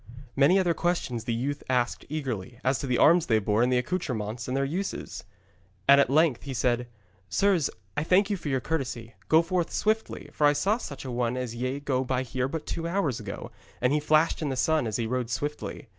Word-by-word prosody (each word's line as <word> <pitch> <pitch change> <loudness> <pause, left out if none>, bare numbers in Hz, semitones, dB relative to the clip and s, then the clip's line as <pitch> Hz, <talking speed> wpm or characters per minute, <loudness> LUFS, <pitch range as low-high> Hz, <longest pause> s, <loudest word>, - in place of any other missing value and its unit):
Many 145 +7 +5
other 180 -3 +2
questions 160 -10 -1
the 120 - -1
youth 140 +5 -2
asked 125 -2 0
eagerly, 125 -7 -4
as 130 +1 +1
to 140 - -4
the 125 -1 +1
arms 170 +2 +5
they 110 - +4
bore 105 +1 +1
and 125 +1 +3
the 125 - +3
accoutrements 120 - -3
and 130 +1 -1
their 140 - +1
uses. 170 - -4 0.6
And 140 0 +8
at 140 - +1
length 150 -2 +3
he 135 -2 -6
said: 120 0 +1 0.4
'Sirs, 180 - +2 0.3
I - - 0
thank 195 +5 +3
you - - +2
for 165 -5 -5
your 130 -2 0
courtesy. 125 -7 -3 0.2
Go 160 +1 +6
forward 175 0 -1
swiftly, 220 +1 -1
for 150 - +3
I 145 - +4
saw 205 +9 +1
such 140 - -7
a 130 - -4
one 120 0 -1
as 125 -2 -3
ye 130 +3 -3
go 135 -3 0
by 130 0 -1
here 130 +1 -2
but 160 +3 -5
two 165 0 -3
hours 170 - 0
ago, - - -7 0.3
and 125 +2 +2
he 150 - +3
flashed 155 +3 +2
in 150 - -1
the 135 - -2
sun 155 0 +1
as 110 - -3
he 115 - -1
rode 125 0 -2
swiftly. 145 +1 -4
135 Hz, 220 wpm, -27 LUFS, 125-160 Hz, 0.6 s, And